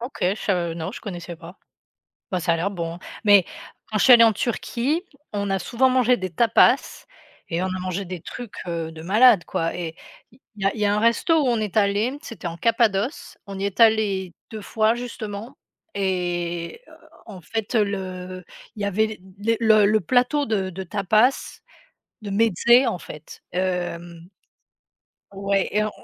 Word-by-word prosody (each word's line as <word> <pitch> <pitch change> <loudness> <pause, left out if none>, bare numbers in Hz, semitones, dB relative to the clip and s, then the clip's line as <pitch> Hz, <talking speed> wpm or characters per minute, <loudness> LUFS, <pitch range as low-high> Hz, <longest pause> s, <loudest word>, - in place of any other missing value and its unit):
OK, 245 +3 -7
je 185 +2 +2
sa 175 -5 -1
non, 165 +2 -4
je - - -8
connaissais 175 -4 -7
pas. 165 +3 -12 0.7
Ben, 185 - -1
ça 170 0 +1
a 165 - +1
l'air 180 +5 -1
bon. 170 -2 -5 0.3
Mais 205 -3 +6 0.5
quand 215 - 0
je - - +2
suis 260 - +8
allée 230 -1 +9
en 225 - +5
Turquie, 245 - -1 0.3
on 200 -1 -2
a 195 - +1
souvent 250 +7 +1
mangé 255 -1 +3
des 185 -3 -5
tapas 225 +8 +2 0.4
et 170 +1 -2
on - - 0
a 185 0 -3
mangé 185 +1 -3
des 180 -2 -7
trucs, 240 +4 -9
heu, 165 -2 -3
de 160 0 -10
malade 210 +1 +5
quoi 165 0 -2
et 165 -2 -5 0.4
il 245 - -23 0.2
y 195 - -2
a 195 - +1
il 220 - -7
y - - +2
a 205 - +2
un - - +1
resto 235 +9 +2
où 285 - +1
on 240 -2 +2
est 210 -3 -4
allés, 215 +6 +1
c'était 230 - -7
en 170 - -7
Cappadoce, 230 - 0
on 195 -1 -7
y 195 - -3
est 200 -1 -3
allés 205 -5 +3 0.2
2 220 - -7
fois 220 +2 +1
justement 230 -1 -7 0.4
et 175 - -2 0.5
en 195 -5 -10
fait 220 +7 -4
le 185 -3 -2 0.3
il 210 - -6
y - - 0
avait 205 +2 +1 0.3
les 225 +3 +1
les 215 -2 +5
le 215 +1 +3
plateau 250 - +2
de 200 -6 -1
de 190 +2 -6
tapas 215 +7 +1 0.6
de 210 - -8
mezzés 230 +5 +4
en 225 -7 -1
fait 150 -1 -11
hem 175 -2 -3 1.0
Ouais 195 0 0
et 210 - +2
on 215 - -1
200 Hz, 185 wpm, -23 LUFS, 180-225 Hz, 1.0 s, allée